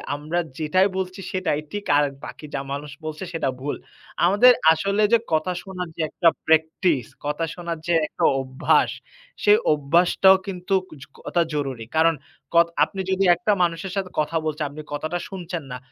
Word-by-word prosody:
আমরা 155 +4 -2 0.2
যেটাই 185 +5 +3
বলছি 185 0 -4
সেটাই 185 -5 -1
ঠিক, 205 0 -5
আর 145 - +4 0.2
বাকি - - -9
যা - - -1
মানুষ 145 +1 -5
বলছে 155 +2 -5
সেটা 165 -5 -1
ভুল। 145 +2 -3 0.5
আমাদের 205 +8 +7 0.2
আসলে 200 +6 0
যে - - +8 0.2
কথা 155 +3 +1
শোনার 180 -3 -6 0.2
একটা 170 +2 +3 0.2
প্র্যাকটিস 160 - +2 0.2
কথা 150 +3 -1
শোনার 170 -2 -4
যে 175 - +2
একটা - - -1 0.2
অভ্যাস, 130 0 +2 0.5
সে 205 - +5 0.2
অভ্যাসটাও 175 +6 +4
কিন্তু 185 0 -4
খুবই 150 - -14 0.6
জরুরি। 135 -6 -3
কারণ 165 +1 +5 0.4
কথা 170 0 +5
আপনি 195 - -2
যদি 190 +1 +1
একটা 180 +5 0
মানুষের 170 +2 -2
সাথে 195 -2 -2
কথা 155 +2 0
বলতে, 155 -1 -3
আপনি 150 +2 -9
কথাটা 155 +4 -2
শুনছেন 175 -4 -6
না, 125 - -4
165 Hz, 160 wpm, -23 LUFS, 150-185 Hz, 0.6 s, যে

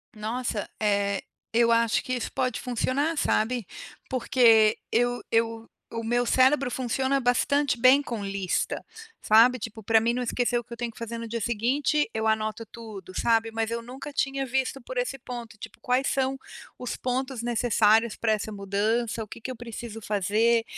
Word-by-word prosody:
Nossa, 220 0 -3
eh, 200 -2 +1 0.3
eu 235 0 +4
acho 230 -1 +2
que 255 - -3
isso 245 - -3
pode 255 -3 -1
funcionar, 260 +6 -1
sabe. 235 -2 +1 0.4
Porque 230 -4 +4
eu 245 +1 +1
eu 225 0 0 0.2
o 230 0 -4
meu 240 +2 +1
cérebro 260 +2 +3
funciona 260 +2 0
bastante 270 +3 +2
bem 260 +3 +6
com 235 -7 -5
lista, 195 -2 -2 0.4
sabe. 230 +4 +6
Tipo, 225 -1 -7
pra 225 +2 +4
mim 230 +1 +1
não 250 - -2
esquecer 245 0 0
o - - -8
que 235 - -36
eu - - -8
tenho 240 0 -3
que 220 - -22
fazer 230 0 -5
no 230 - -6
dia 230 +1 -4
seguinte, 255 +7 +1
eu 220 0 -1
anoto 220 +1 0
tudo, 215 -4 -10
sabe. 225 -1 +2
Mas 225 0 -1
eu 235 0 -2
nunca 260 +5 -8
tinha 270 -1 -1
visto 265 +1 -1
por 255 +1 -8
esse 250 +2 -1
ponto, 240 -3 -8
tipo, - - -11
quais 255 +2 +1
são 270 0 0 0.4
os 250 - -4
pontos 255 0 -2
necessários 230 -2 +3
pra 225 -1 0
essa 215 0 -3
mudança, 215 +3 -1
o - - -11
que 215 - -10
que 260 - -5
eu 255 - -6
preciso 230 -1 -7
fazer, 215 +3 +2
235 Hz, 180 wpm, -26 LUFS, 220-250 Hz, 0.4 s, bem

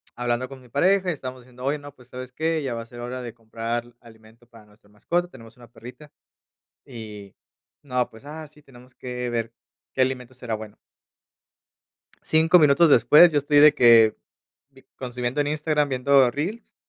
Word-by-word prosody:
hablando 120 +1 -2
con 135 -1 -12
mi 125 - -19
pareja 190 +5 +2
y - - 0
estábamos 130 -2 -8
diciendo: 125 0 -15
"Oye, 145 +2 -1
no, 145 0 -13
pues, 125 0 -20
¿sabes 125 0 -9
qué? 160 +3 -1
Ya 130 -4 -4
va 115 - -5
a - - -16
ser 120 0 -13
hora 125 +1 -6
de 120 -2 -8
comprar 115 +1 -6
alimento 110 0 -19
para 115 -3 -18
nuestra 105 0 -25
mascota". 175 +12 -2
Tenemos 115 -4 -15
una 120 -1 -16
perrita 125 +6 -14 0.8
y, 105 -6 -10 0.5
no, 125 -3 -2
pues 110 +5 -17
ah, 155 +1 -9
sí, 150 0 -20
tenemos 125 -2 -18
que 125 -1 -5
ver 115 -1 -3 0.4
qué 130 - +2
alimento 130 -1 -2
será 120 -3 -6
bueno. 110 -1 -8 1.5
5 160 +3 +4
minutos 150 +2 +5
después, 155 +4 +6
yo 145 - +2
estoy 145 +1 +2
de 150 0 +7
que 115 -2 +5 0.8
consumiendo 125 +2 -4
en 145 - 0
Instagram, 150 -1 0
viendo 130 -1 +3
reels. 185 - -6
125 Hz, 180 wpm, -23 LUFS, 120-145 Hz, 1.5 s, de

